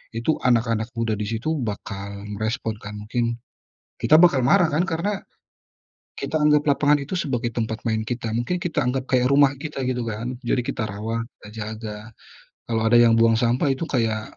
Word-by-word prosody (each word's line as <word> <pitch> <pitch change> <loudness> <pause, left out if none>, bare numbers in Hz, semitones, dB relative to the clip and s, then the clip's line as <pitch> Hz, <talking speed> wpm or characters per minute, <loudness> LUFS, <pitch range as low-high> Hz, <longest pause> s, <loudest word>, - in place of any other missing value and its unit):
itu 120 +8 0
anak-anak 115 -2 +2
muda 115 -1 -1
di 105 - -2
situ 120 +9 -2
bakal 100 -3 -5 0.2
merespon, 110 -1 -2
kan. 105 0 -8
Mungkin 115 +2 -1 0.6
kita 155 - +4
bakal 165 -4 +6
marah, 170 +7 +4
kan? 165 +5 +1
Karena 190 +4 -1 1.0
kita 145 +3 -2
anggap 150 0 +4
lapangan 145 0 +3
itu 140 +4 -6
sebagai 125 -9 -1
tempat 110 -1 -2
main 110 -1 0
kita, 115 0 -3
mungkin 120 +10 -1
kita 175 -3 -1
anggap 130 +1 -1
kayak 125 -1 +2
rumah 140 0 +5
kita, 150 -4 -4
gitu 125 -1 -1
kan. 115 +4 -4
Jadi, 125 - 0
kita 120 -5 -3
rawat, 110 +3 -3
kita - - -14
jaga. 110 -1 -6 0.7
Kalau 115 -1 0
ada 115 +1 +5
yang 115 -1 +5
buang 115 0 +4
sampah 120 +4 +2
itu 150 +5 -4
kayak 110 -4 -1
120 Hz, 175 wpm, -23 LUFS, 110-140 Hz, 1.0 s, bakal